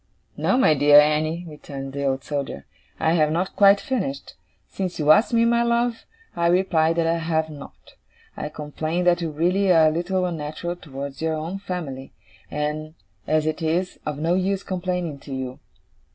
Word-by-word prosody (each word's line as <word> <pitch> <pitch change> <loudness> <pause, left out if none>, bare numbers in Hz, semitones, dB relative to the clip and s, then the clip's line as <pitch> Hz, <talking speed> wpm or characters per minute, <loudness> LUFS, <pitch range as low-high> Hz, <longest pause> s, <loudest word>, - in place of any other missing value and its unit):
'No, 255 - +1
my 260 -12 +5
dear 145 0 +7
Annie,' 155 +3 +1
returned 140 -3 -8
the 140 0 -3
Old 135 0 -1
Soldier, 140 - -4 0.3
'I 160 - +2
have 155 -3 +3
not 175 +4 -1
quite 200 0 +6
finished. 195 - -3 0.3
Since 185 -2 -4
you 150 -1 +4
ask 210 +11 +5
me, 230 -1 +3
my 235 0 +3
love, 235 0 0 0.3
I 170 -1 +1
reply 170 -3 +3
that 165 0 0
I 165 +1 +1
have 160 -1 -1
not. 145 -2 -12 0.4
I 150 - -4
complain 155 +3 -3
that 175 0 +3
you 165 - -2
really 180 +6 +1
are 160 -2 +6
a - - -1
little 180 +3 -1
unnatural 165 +1 -4
towards 140 -3 -8
your 160 0 0
own 165 +5 -4
family; 155 -9 -6 0.4
and, 150 +1 -3 0.3
as 155 0 +2
it 155 +2 -2
is 170 +3 -1
of 150 -1 -4
no 165 +3 0
use 190 +1 0
complaining 180 -5 -3
to 135 -1 -7
you. 130 -1 -5
160 Hz, 180 wpm, -23 LUFS, 150-180 Hz, 0.4 s, dear